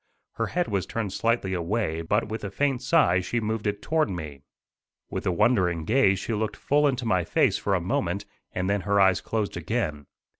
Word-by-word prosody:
Her 115 - 0
head 175 +7 -1
was 100 -3 -1
turned 105 -5 -3
slightly 115 -4 0
away, 85 -1 -1
but 105 +7 0
with 110 +1 -5
a 100 - -3
faint 135 +4 0
sigh 130 - +3
she 105 +6 -2
moved 110 -1 -2
it 105 0 -2
toward 155 -5 +1
me. 75 -7 -6 0.7
With - - -3
a - - +3
wondering 90 -4 +2
gaze 110 -3 +3
she 115 - -3
looked 110 0 -2
full 145 +1 +2
into 130 -3 -1
my 95 -5 +2
face - - +2
for - - 0
a - - +1
moment, - - -1 0.3
and 90 0 -2
then 100 0 +1
her 100 +2 +1
eyes 95 -1 +4
closed 110 -2 -2
again. 85 - -2
105 Hz, 200 wpm, -26 LUFS, 90-115 Hz, 0.7 s, eyes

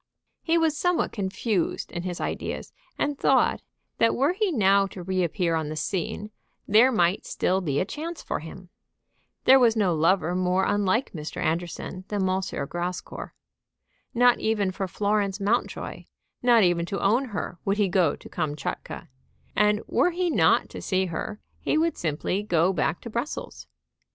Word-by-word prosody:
He 330 0 +2
was 325 -2 +2
somewhat 355 +3 +1
confused 195 -1 -2
in 175 - -4
his 175 -1 -4
ideas, - - -4 0.2
and 290 -1 -1
thought, - - +3 0.4
that 230 - +4
were 280 +7 +2
he 400 0 0
now 200 - +4
to 185 -2 -9
re 185 0 0
appear 170 0 0
on 160 -2 -1
the 155 - -4
scene 190 +6 -3 0.4
there 225 +6 +6
might 180 -4 +2
still 190 +1 0
be 145 -5 0
a - - +1
chance 320 - -6
for - - -2
him. 175 +3 -10 0.7
There 265 +1 +7
was 235 -3 +4
no 200 -5 +2
lover 170 +2 +2
more 185 +1 +1
unlike 205 +5 +1
Mr. 155 -3 -6
Anderson 175 +3 -3
than 200 -3 0
M. 185 +1 +1 0.3
Grascour. 175 +2 -5 0.8
Not 245 0 +5
even 210 -3 0
for 190 +1 -3
Florence 205 +1 0
Mountjoy, 205 +4 -2 0.4
not 240 -3 +5
even 175 -1 +2
to 195 - -3
own 235 +7 +2
her, 200 -6 -5
would 200 +1 0
he 205 -2 +3
go 180 -4 +2
to - - -13
Kamtchatka; 150 -2 -4 0.5
and 210 +1 +3
were 360 - +2
he 355 0 -1
not - - +3
to - - -7
see 190 -1 0
her 185 +5 -5 0.2
he - - 0
would 330 +1 +1
simply 165 +4 -2
go 180 -2 +2
back 170 0 -1
to 235 - -7
Brussels. 235 +7 -5
195 Hz, 165 wpm, -26 LUFS, 175-230 Hz, 0.8 s, There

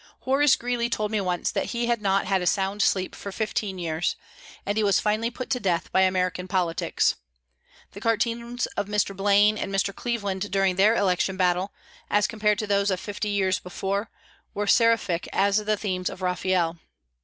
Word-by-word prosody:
Horace 275 +2 +4
Greeley 240 -1 -2
told 215 -2 -1
me 215 -2 0
once 180 -2 -1
that - - -1
he 235 - 0
had 235 -2 0
not 195 -1 +1
had 190 0 +1
a 180 - -1
sound 195 +2 0
sleep 185 -2 +1
for 200 - -7
fifteen 210 -2 -2
years, 165 -1 -1 0.5
and 205 - -1
he 220 - +1
was 200 -3 +3
finally 215 +2 0
put 250 +2 -7
to 250 - +1
death 180 -6 -1
by 190 - +3
American 185 -1 0
politics. 180 -3 0 0.7
The 200 - -11
cartoons 235 +2 -1
of 205 - -2
Mr. 205 -1 0
Blaine 205 +2 +3
and - - -3
Mr. 195 0 0
Cleveland 205 -5 -3
during 195 -2 +2
their 205 +4 +4
election 190 -2 +1
battle, 185 +1 +1 0.4
as 205 -1 +3
compared 210 -2 +1
to 215 - -2
those 200 0 +1
of 185 -2 0
fifty 210 +1 -4
years 190 -2 +1
before, 195 +3 -3 0.5
were 205 - -1
seraphic 230 -6 +2
as 200 +1 +2
the 215 0 0
themes 185 -3 -2
of 185 - -9
Raphael. 180 -2 0
200 Hz, 185 wpm, -25 LUFS, 185-215 Hz, 0.7 s, Horace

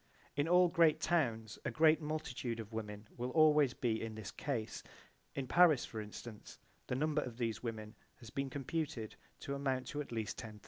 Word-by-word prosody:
In 145 +2 +1
all 180 +1 +6
great 165 -3 +4
towns 115 -11 0
a - - -1
great 155 0 +4
multitude 150 -6 -3
of 110 0 -7
women 105 -1 -5
will 125 +1 -2
always 150 -2 +5
be 115 -3 0
in 110 -1 -4
this 105 -1 -6
case. 120 -7 -3 0.5
In 135 - -2
Paris, 160 0 +5
for 110 - -5
instance, 105 +1 -9 0.3
the - - -1
number 150 +2 +1
of 120 -4 -6
these 115 -4 -1
women 110 -2 -5 0.2
has 115 -2 -12
been 135 0 -2
computed 140 -3 -3 0.3
to 140 - -3
amount 135 -2 -1
to 150 -2 -2
at 145 - -8
least 110 -3 -3
10,000. 105 -2 -8
125 Hz, 185 wpm, -36 LUFS, 110-150 Hz, 0.5 s, all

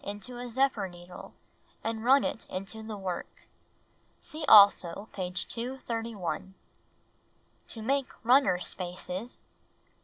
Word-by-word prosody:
^^< 200 - -3
^ - - -9
i"to 240 +4 -8
a 245 0 -6
zephyr 240 -5 +1
needle, 175 0 -12 0.5
and 225 0 -3
run 270 +3 +5
it - - -3
into 195 +4 -5
the 220 -1 -6
work.'' 185 -3 -6 0.7
See 310 +1 -7
also 200 -2 +7
page 180 -1 -1
231. 230 -6 -4 1.1
To 225 - -7
Make 270 +2 0
Runner 245 -7 +5
Spaces 180 +4 -5
1. - - -38
220 Hz, 125 wpm, -29 LUFS, 185-245 Hz, 1.1 s, also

